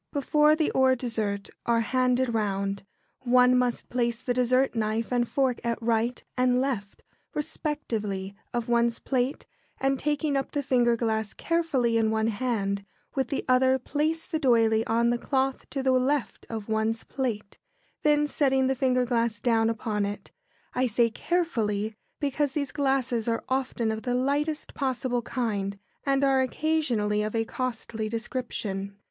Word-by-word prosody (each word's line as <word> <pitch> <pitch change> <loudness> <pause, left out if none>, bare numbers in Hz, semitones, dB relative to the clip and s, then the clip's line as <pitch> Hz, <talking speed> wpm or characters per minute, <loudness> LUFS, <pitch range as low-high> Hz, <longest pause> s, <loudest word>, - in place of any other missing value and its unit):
] - - -54
Before 300 +1 +3
the 310 -1 +1
or 260 0 +4
dessert 220 -5 -2 0.2
are 230 -1 +3
handed 255 0 +1
round, 200 -2 -1 0.4
one 250 0 +5
must 250 -1 0
place 235 -1 0
the 245 - 0
dessert 255 +2 +2
knife 220 0 -1
and 240 -1 +2
fork 260 -2 0
at 235 -1 -1
right 230 +1 0
and 250 0 +3
left, 240 -7 -3 0.3
respectively, 225 - -3 0.2
of 240 -1 -2
one's 235 -1 +2
plate, 260 +1 -1 0.3
and, 270 0 +1
taking 295 0 0
up 270 -1 -2
the 290 -1 -1
finger 245 -3 +3
glass 220 -2 -1
carefully 285 -9 +1
in 220 -1 +2
one 220 0 +1
hand, 200 -3 -1 0.3
with 265 -2 0
the 275 - -3
other 260 +1 +4
place 310 +5 -1
the 320 -3 -2
d'oyley 225 -5 +4
on 235 +1 +2
the 240 - 0
cloth 265 +1 -1
to 270 -2 -3
the 265 - +3
left 260 +2 0
of 220 -3 -5
one's 220 +1 0
plate, 225 -7 -4 0.4
then 295 0 +3
setting 270 -3 +2
the 265 - +2
finger 255 -1 +2
glass 230 -3 0
down 225 0 +2
upon 215 -2 -1
it. 205 +1 -5 0.4
I 255 0 +2
say 230 0 +2
"carefully," 220 - -1 0.3
because 285 -1 0
these 285 -2 -2
glasses 265 -5 0
are 230 -1 0
often 255 -4 0
of 220 0 -3
the 245 0 -1
lightest 290 +4 -1
possible 255 -2 -1
kind, 205 -5 -2 0.3
and 275 0 +2
are 270 -1 +4
occasionally 255 -7 0
of 215 +1 -2
a 225 0 +1
costly 225 -3 -3
description. 215 -4 -4
245 Hz, 160 wpm, -27 LUFS, 225-270 Hz, 0.4 s, one